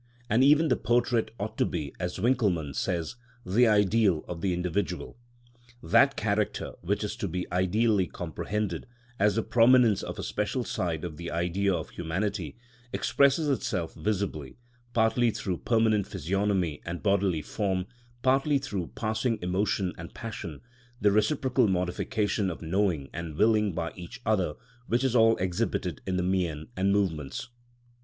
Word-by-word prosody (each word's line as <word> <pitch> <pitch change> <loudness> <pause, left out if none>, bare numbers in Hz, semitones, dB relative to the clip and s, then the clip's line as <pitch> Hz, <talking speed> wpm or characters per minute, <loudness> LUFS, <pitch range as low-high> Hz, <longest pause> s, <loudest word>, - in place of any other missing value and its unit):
And 115 +4 +5
even 150 +3 +5
the 125 - +4
portrait 120 +1 +1
ought 105 +2 -5
to - - +4
be, 70 -3 -4
as 90 0 -3
Winckelmann 95 - +1
says, 85 - -2 0.3
the 115 +7 +4
ideal 105 -4 +3
of 85 -1 -6
the 95 - +1
individual. 90 +1 -2 0.7
That 80 - +4
character - - -1
which 100 +5 -1
is 105 +1 -3
to 110 -5 -2
be 90 +1 -3
ideally 95 +2 +2
comprehended, 100 0 -4 0.3
as 105 +1 +3
the 115 - +1
prominence 120 -3 +5
of - - -6
a - - -4
special - - -1
side 80 -3 -2
of 80 -4 -5
the 85 +1 -5
Idea 90 +4 0
of 85 -4 -3
humanity, 95 +3 -3 0.3
expresses 140 +3 +2
itself 95 - -1
visibly, 95 -10 -3 0.3
partly 115 +1 +3
through 95 -4 -3
permanent 110 -3 +2
physiognomy 95 -4 -1
and 85 +1 -5
bodily 100 -6 +2
form, 95 - -1 0.4
partly 135 +3 +3
through 100 -11 -3
passing 110 +1 0
emotion 90 +1 0
and 85 +2 -9
passion, 105 -10 -6 0.4
the 105 0 +4
reciprocal 130 +3 +2
modification 95 +3 0
of 85 - -6
knowing 85 -4 0
and 85 -2 -5
willing 105 -2 +3
by 85 +1 -3
each 95 +8 -9
other, 95 -9 +1 0.3
which 120 +3 +1
is 130 -2 +1
all 115 -1 +5
exhibited 90 -3 -2
in 95 -1 0
the 90 - 0
mien 90 -4 -1
and 95 +1 +2
movements. 90 - -1
100 Hz, 150 wpm, -28 LUFS, 85-110 Hz, 0.7 s, And